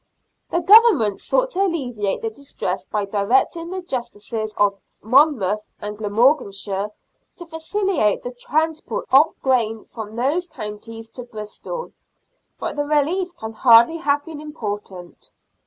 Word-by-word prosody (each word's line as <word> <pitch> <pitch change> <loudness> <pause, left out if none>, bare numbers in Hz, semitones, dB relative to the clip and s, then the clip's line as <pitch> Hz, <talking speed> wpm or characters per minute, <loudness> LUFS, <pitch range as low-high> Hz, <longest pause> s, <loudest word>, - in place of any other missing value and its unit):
The 340 - 0
Government 350 - +6
sought - - +1
to 390 - -1
alleviate 245 - -1
the 225 - -2
distress 220 -7 -4
by 210 -1 -1
directing 240 - +1
the 375 0 -5
justices 225 - -4
of 200 -1 +2 0.2
Monmouth 220 -5 +3 0.2
and 210 0 -5
Glamorganshire 205 -2 +1 0.5
to 345 - -9
facilitate 325 - 0
the 245 - -5
transport 320 - -2
of 280 +4 +5
grain 225 -4 +1
from 220 -2 -9
those 290 +9 0
counties 225 -1 -7
to 245 - -8
Bristol, 235 - -7 0.7
but - - -3
the 290 - 0
relief 330 +5 0
can 220 -9 -7
hardly 235 +6 +6
have 290 -3 0
been 315 -2 -8
important. 205 - -7
245 Hz, 130 wpm, -21 LUFS, 210-320 Hz, 0.7 s, Government